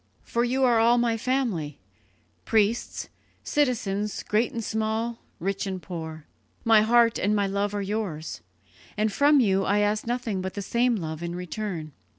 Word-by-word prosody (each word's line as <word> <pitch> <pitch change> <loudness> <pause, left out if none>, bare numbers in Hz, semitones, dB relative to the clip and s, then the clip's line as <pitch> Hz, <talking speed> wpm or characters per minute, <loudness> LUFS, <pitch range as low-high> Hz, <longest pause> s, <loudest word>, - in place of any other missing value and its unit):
For 235 - 0
you 260 +2 +1
are 240 -3 +4
all 235 +2 +5
my 235 -1 +2
family 225 - -1 0.7
priests, 220 +1 0 0.3
citizens, 210 -8 0
great 220 +3 +1
and 230 - -4
small, 220 +2 -2 0.2
rich 195 +3 -2
and 190 -1 -3
poor. 160 -4 -7 0.4
My 225 -2 +6
heart 230 +1 +4
and 210 +2 +2
my 205 -1 +2
love 200 +1 -1
are 200 - -1
yours, 195 -6 -4 0.6
and 215 -1 +1
from 290 +5 +5
you 195 -5 +3
I 200 +2 +2
ask 210 +1 +1
nothing 235 -5 -1
but 190 0 -5
the 200 - -3
same 240 +4 +2
love 160 -5 -4
in 170 0 -4
return. 180 -3 -4
210 Hz, 165 wpm, -26 LUFS, 190-235 Hz, 0.7 s, My